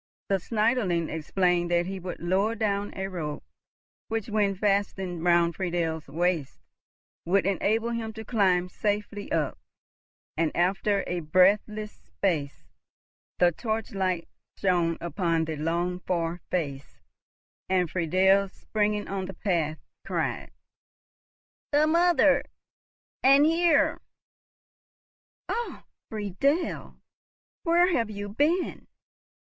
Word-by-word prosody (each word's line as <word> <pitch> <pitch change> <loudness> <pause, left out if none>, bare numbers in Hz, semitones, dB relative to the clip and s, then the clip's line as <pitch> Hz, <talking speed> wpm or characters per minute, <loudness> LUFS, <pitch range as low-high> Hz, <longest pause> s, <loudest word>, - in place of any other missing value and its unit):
The 195 - +3
Schneiderlein 210 -5 0
explained 175 +2 +1
that 175 0 +2
he 190 +1 -5
would 180 0 -6
lower 195 +6 +1
down 205 -2 -1
a 190 0 -3
rope, 155 -6 -5 0.6
which, 225 -1 -3
when 205 -2 +1
fastened 190 -3 -1
round 170 -1 +3
Friedel's 170 -4 -2
waist, 165 -1 -1 0.7
would 190 +2 +2
enable 220 +4 +1
him 230 -1 -3
to 220 0 -8
climb 185 -6 +2
safely 205 +2 -3
up; 160 -3 -1 0.8
and, 160 0 +1
after 195 +3 +1
a 180 - -2
breathless 200 +6 +2
space, 155 -8 -3 0.7
the 175 -1 +5
torchlight 195 -4 -2 0.3
shone 175 -3 +1
upon 170 -2 0
the 160 0 -3
longed 170 +4 -1
for 170 -1 -1
face, 140 -6 -3 0.7
and 185 -2 +2
Friedel 190 +3 +3
springing 210 +1 -1
on 195 -1 -3
the 190 - -8
path, 165 -6 -1 0.3
cried, - - -2 1.2
"The 295 +1 +4
mother!—and 310 -3 +2
here!"— 330 -1 +3 1.5
"Oh, 475 +1 -4 0.3
Friedel, 220 - -1 0.7
where 345 +2 +4
have 230 -7 +1
you 205 -1 -5
been? 300 - 0
190 Hz, 105 wpm, -27 LUFS, 175-215 Hz, 1.5 s, the